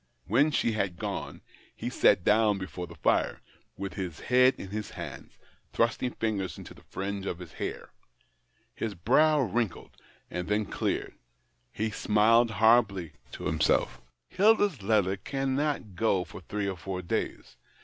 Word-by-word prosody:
When 130 - +3
she 130 -5 +1
had 100 -5 -1
gone, - - -5 0.3
he - - -4
sat 90 - +4
down 105 0 +4
before 95 -2 -6
the 85 - -12
fire, - - +1 0.4
with 95 0 -5
his 90 -5 -5
head 125 +1 +4
in 95 - -8
his 105 0 -4
hands, - - -9 0.4
thrusting 115 +2 +1
fingers 105 -4 -2
into - - -10
the - - -17
fringe 100 0 -5
of 85 - -3
hair. - - -5 0.8
His 110 -3 -4
brow 145 - +4
wrinkled, 115 -4 -2 0.4
and 90 0 -3
then 105 +1 +1
cleared; - - -2 0.6
he 110 - -2
smiled 115 +3 +4
horribly 105 -6 +3 0.2
to - - -7
himself 75 -6 +1
" - - -53
Hilda's 205 - +3
letter 100 -2 +2
cannot 135 -1 -2
go 95 -1 +2
for 90 - -11
three 100 +3 -3
or 95 -2 -3
four 90 +1 -5
days. 85 - -3
105 Hz, 150 wpm, -29 LUFS, 95-120 Hz, 0.8 s, sat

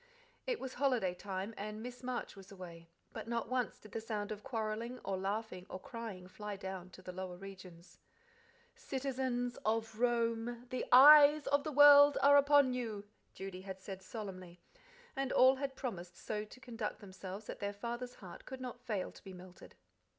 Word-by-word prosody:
It - - -1
was 260 -1 -6
holiday 245 -9 +1
time, 190 +3 -5
and 215 +2 -5
Miss 245 0 -8
Marsh 250 -3 -4
was 195 0 -13
away, 170 -3 -10 0.2
but - - -7
not 235 -1 -2
once 250 -2 -1
did 215 - -15
the 225 - -4
sound 215 -2 -4
of 210 -1 -5
quarrelling, 230 -1 -3
or 195 - -1
laughing, 195 -1 -3
or 185 - -6
crying 220 -5 -7
fly 210 +2 -6
down 190 -2 -6
to 185 - -13
the 180 - -6
lower 180 -1 -6
regions. 185 -3 -12 0.7
"'Citizens 260 - -3
of 225 0 -1
Rome, 235 0 0
the 255 - -2
eyes 295 +3 +9
of 285 0 +2
the 310 - -3
world 290 0 +8
are 285 +1 +8
upon 285 -2 +5
you!'" 220 -5 -4 0.3
Judy 190 -1 -7
had 190 0 -7
said 190 0 -8
solemnly, 185 -3 -8 0.6
and 270 -1 -2
all 260 +1 +6
had 275 0 -3
promised 180 -10 -6
so 210 -1 -4
to 235 - -14
conduct 225 -4 -5
themselves 190 +1 -8
that - - -7
their 200 0 -2
father's 240 +4 -5
heart 185 -3 -11
could 260 0 -7
not 250 -1 -7
fail 215 -7 -3
to - - -16
be 190 - -9
melted. 180 0 -13
220 Hz, 180 wpm, -35 LUFS, 190-255 Hz, 0.7 s, eyes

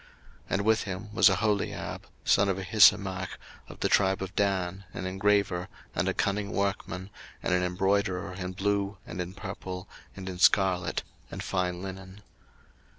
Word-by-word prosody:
02:038:023 - - -30
And 100 - +1
with 110 +1 +3
him 100 +2 -6
was 110 - +7
Aholiab, 100 +2 -1 0.2
son 100 0 +4
of 95 - 0
Ahisamach, 95 -1 +4 0.3
of - - -12
the - - +3
tribe 95 -1 +3
of 95 -1 -7
Dan, 95 -1 0
an 95 - -4
engraver, 95 -1 +1 0.3
and - - 0
a - - 0
cunning 100 +1 0
workman, 100 -1 -2 0.3
and - - +1
an 90 - +3
embroiderer 95 0 0
in 90 0 -5
blue, 100 +1 0
and 90 - -5
in 90 +2 -6
purple, 95 -2 -6 0.3
and 95 -1 -8
in 90 -1 -5
scarlet, 95 -2 +3 0.3
and - - -6
fine 90 -1 -1
linen. 95 +1 -8
95 Hz, 155 wpm, -29 LUFS, 90-100 Hz, 0.3 s, was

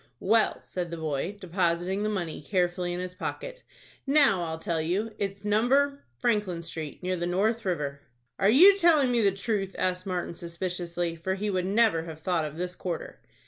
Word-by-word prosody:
"Well," 220 +3 +2
said 180 -2 -4
the 170 - -5
boy, 160 +5 -3
depositing 180 +1 0
the 215 - 0
money 175 -8 -3
carefully 175 +1 0
in 175 - -3
his 180 0 -5
pocket, - - -6 0.5
"now 275 -10 +4
I'll 160 0 -4
tell 165 -1 -1
you. 195 +8 -1
It's 195 0 -3
No. 270 +7 +2
— 120 -1 -41
Franklin 205 - 0
Street, 160 -1 -6
near 185 0 0
the 175 0 -2
North 215 +6 +1
River." 145 -6 -2 0.4
"Are 195 - +4
you 360 - +8
telling 310 -7 +5
me 240 -1 +2
the 200 -2 +4
truth?" 195 0 -2
asked 185 0 -1
Martin, 180 -2 -2
suspiciously, 170 0 -3
for 190 +3 -2
he 205 +2 -2
would 185 -1 -1
never 205 -5 +3
have 160 -1 -9
thought 170 -1 0
of 150 +1 -7
this 180 +1 -3
quarter. 175 -3 -5
185 Hz, 185 wpm, -27 LUFS, 170-210 Hz, 0.5 s, you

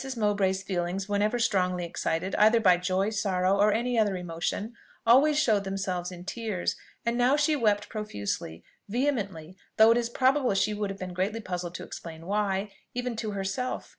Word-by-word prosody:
Mowbray's 200 -3 +1
feelings 185 +1 -2
whenever 205 +3 +1
strongly 180 -6 +1
excited, 170 +2 -2
either 220 +2 +6
by 185 -5 +5
joy, 185 +3 0
sorrow, 195 -2 +1
or 210 +1 +5
any 240 +2 +1
other 205 -3 +2
emotion, 180 +6 -3 0.3
always 275 +6 +5
showed 220 -9 +3
themselves 190 -2 -3
in 180 0 -10
tears, 215 -4 -2 0.3
and 235 +1 0 0.2
she 300 +1 +3
now 290 - -1
wept 210 -2 +2
profusely 100 - -4 0.3
vehemently; 200 - -2 0.2
though 220 +1 +8
it 230 - +4
is 235 -1 -1
probable 260 -2 +2
she 210 +2 +2
would 205 -1 -2
have 195 - -5
been 185 -2 -6
greatly 195 +5 -1
puzzled 180 -4 -5
to - - -6
explain 165 -1 -9
why, 200 0 -1 0.2
even 245 -1 -2
to 220 -2 -3
herself. 200 +6 -3
200 Hz, 170 wpm, -28 LUFS, 185-225 Hz, 0.3 s, though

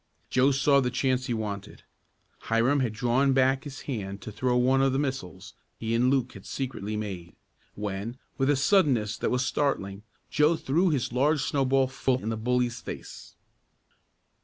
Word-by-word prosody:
Joe 130 +2 +4
saw 140 0 +3
the 125 - 0
chance 130 0 0
he 120 - -1
wanted. 105 -3 -5 0.6
Hiram 120 +6 +2
had 125 -4 0
drawn 125 +4 +2
back 135 +1 +2
his 135 -2 -8
hand 100 -7 -5
to 110 - -7
throw 125 +4 0
one 130 +2 +3
of 135 -1 +2
the - - +1
missiles 135 - -4 0.2
he 115 0 -3
and 120 +2 +3
Luke 130 -2 +1
had 100 - -11
secretly 110 -6 -4
made, 95 -5 -6 0.4
when, 105 +3 -4 0.2
with 135 0 +1
a 145 - +4
suddenness 135 - +2
that - - 0
was 125 +1 0
startling, 100 -10 -1 0.3
Joe 150 +3 +4
threw 165 +5 +1
his 135 -6 -1
large 145 +3 +2
snowball 135 -2 +2
full 130 -1 0
in 110 - -2
the 115 - -1
bully's 120 +1 0
face. - - -9
125 Hz, 170 wpm, -27 LUFS, 110-135 Hz, 0.6 s, Joe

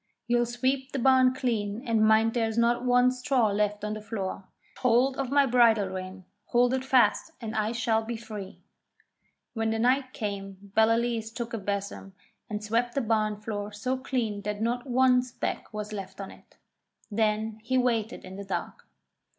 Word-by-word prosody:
You'll 240 0 +2
sweep 260 +3 -1
the - - -1
barn 260 0 +5
clean, 225 -3 -2
and 225 -2 +2
mind 220 +1 +4
there 230 -2 +1
is 220 - -5
not 235 +1 +2
one 250 0 +4
straw 250 -2 +1
left 210 0 0
on 210 - -2
the 215 - -6
floor. 200 -3 -5 0.3
Catch - - -17
hold 255 +2 +3
of 270 -2 -2
my 280 0 +4
bridle 230 -5 +4
rein, 185 0 -7 0.2
hold 245 +1 +3
it 260 0 0
fast, 265 +4 +3
and 225 -2 -5
I 215 0 0
shall 225 -1 +1
be 230 +1 -4
free.' 215 -4 -9 0.9
When 225 -1 -1
the 225 - 0
night 255 +3 +2
came 200 -2 -6
Ballaleece 225 0 +2
took 235 0 -5
a 225 - -2
besom 200 -1 -4 0.4
and 210 -1 -4
swept 235 +3 0
the 275 - +2
barn 215 -2 0
floor 210 -1 -4
so 250 +5 -2
clean 245 -6 -2
that 210 0 -4
not 240 +3 -1
one 250 0 +4
speck 250 -1 -5
was 210 0 -5
left 195 -1 -7
on 195 - -6
it. - - -19 0.5
Then 215 0 0
he 260 +4 0
waited 235 -3 0
in 185 +1 -9
the 200 - -6
dark. 195 -2 -5
225 Hz, 185 wpm, -28 LUFS, 210-245 Hz, 0.9 s, barn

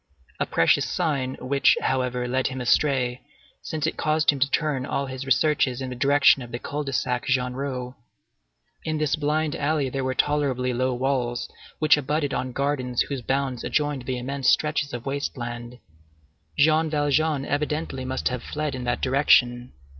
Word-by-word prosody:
A - - 0
precious - - +2
sign 130 -4 -1
which, 140 +2 +3
however, 125 -1 -1
led 130 +1 0
him 130 0 -5
astray, 125 -1 +1 0.4
since 155 -2 -3
it 160 - -2
caused 155 0 +3
him 140 - -5
to 135 +1 +2
turn 145 -3 0
all 140 +2 -2
his 130 0 -6
researches 135 -2 +2
in 130 -1 -4
the - - -5
direction 140 +1 +4
of 120 -1 -9
the 120 - -3
Cul 145 +4 -4
de 140 - -4
Sac 125 -2 -1
Genrot. 125 0 -2 0.9
In 155 -1 -2
this 155 -2 +1
blind 155 0 0
alley 145 -2 0
there 135 +1 -3
were 130 0 -1
tolerably 135 -4 +1
low 130 +1 0
walls 125 -2 -1 0.3
which 155 -1 +5
abutted 150 0 -1
on 130 0 -2
gardens 130 -2 -1
whose 140 -3 -5
bounds 130 0 -1
adjoined 145 -4 -1
the 130 -1 -1
immense 135 +2 -1
stretches 150 -1 +1
of 120 -1 -6
waste 140 0 -3
land. 120 0 -6 0.8
Jean 155 +2 +4
Valjean 145 -1 +1
evidently 150 -2 -2
must 130 0 -1
have 125 -1 -4
fled 150 +1 -3
in 125 -1 -5
that 120 - -1
direction. 125 -2 +3
135 Hz, 170 wpm, -24 LUFS, 125-145 Hz, 0.9 s, which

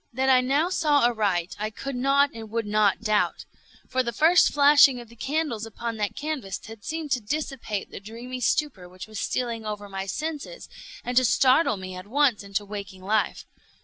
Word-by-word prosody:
That 260 +2 0
I 255 -1 +6
now 280 +7 +1
saw 295 -7 +3
aright 200 -7 0
I 215 +1 -2
could 270 +5 -6
not 275 +3 +3
and 225 -1 -9
would 230 0 -2
not 210 -1 +2
doubt; 215 -2 0 0.4
for 260 - +1
the 235 -2 -2
first 325 +8 +5
flashing 285 -2 +6
of 240 -2 -11
the 235 - -16
candles 275 -3 -2
upon 225 +1 -5
that 210 -1 -2
canvas 285 -11 -4
had 220 0 -11
seemed 320 -2 -4
to 250 -2 +1
dissipate 240 -4 -4
the - - -7
dreamy 235 +5 -8
stupor 235 - 0
which 180 0 -9
was 215 -1 -7
stealing 235 -3 -2
over 210 -1 -5
my 195 0 -5
senses, 315 - -5 0.4
and 245 - -3
to 255 - +6
startle 255 +1 +4
me 185 -1 -7
at 185 +1 -9
once 265 -1 +2
into 200 +1 -3
waking 200 -2 -8
life. 210 +2 0
235 Hz, 190 wpm, -25 LUFS, 210-280 Hz, 0.4 s, I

